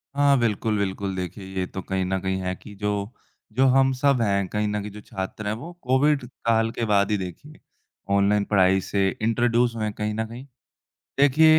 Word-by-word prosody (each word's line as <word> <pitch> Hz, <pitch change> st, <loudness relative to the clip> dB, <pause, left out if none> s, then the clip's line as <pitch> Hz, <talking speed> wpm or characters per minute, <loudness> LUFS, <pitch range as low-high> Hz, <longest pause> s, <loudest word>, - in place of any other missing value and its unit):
हाँ। 140 Hz, -1 st, +4 dB
बिल्कुल, 110 Hz, -1 st, 0 dB
बिल्कुल। 100 Hz, -1 st, -2 dB
देखिए 95 Hz, +1 st, -5 dB
ये 90 Hz, -, 0 dB
तो 95 Hz, -, -6 dB
कहीं 95 Hz, 0 st, -2 dB
न 95 Hz, +1 st, -1 dB
कहीं 95 Hz, 0 st, -1 dB
है 90 Hz, 0 st, -2 dB
कि 105 Hz, -, -13 dB
जो 105 Hz, +2 st, -2 dB, 0.4 s
जो 130 Hz, +3 st, +3 dB
हम 135 Hz, +1 st, +4 dB
सब 130 Hz, -1 st, +2 dB
हैं, 100 Hz, -3 st, +1 dB
कहीं 105 Hz, +2 st, -1 dB
न 105 Hz, 0 st, -1 dB
कहीं 105 Hz, +1 st, -6 dB
जो 105 Hz, +1 st, -10 dB
छात्र 95 Hz, +2 st, -5 dB
हैं, 105 Hz, -, 0 dB
वो 150 Hz, +10 st, -7 dB
कोविड 135 Hz, +2 st, +2 dB, 0.2 s
काल 115 Hz, 0 st, +3 dB
के 115 Hz, -, -2 dB
बाद 100 Hz, -1 st, +2 dB
ही 105 Hz, -, +2 dB
देखिए 95 Hz, -, -8 dB, 0.6 s
ऑनलाइन 100 Hz, +1 st, +3 dB
पढ़ाई 95 Hz, -2 st, +3 dB
से 100 Hz, +1 st, 0 dB
इंट्रोड्यूस 120 Hz, +1 st, +2 dB
हुए 110 Hz, -, -3 dB
हैं 105 Hz, -1 st, -2 dB
कहीं 105 Hz, +1 st, -2 dB
न 110 Hz, +1 st, -2 dB
कहीं। 120 Hz, +4 st, -9 dB, 0.7 s
देखिए 155 Hz, +3 st, +6 dB
105 Hz, 200 wpm, -24 LUFS, 100-120 Hz, 0.7 s, देखिए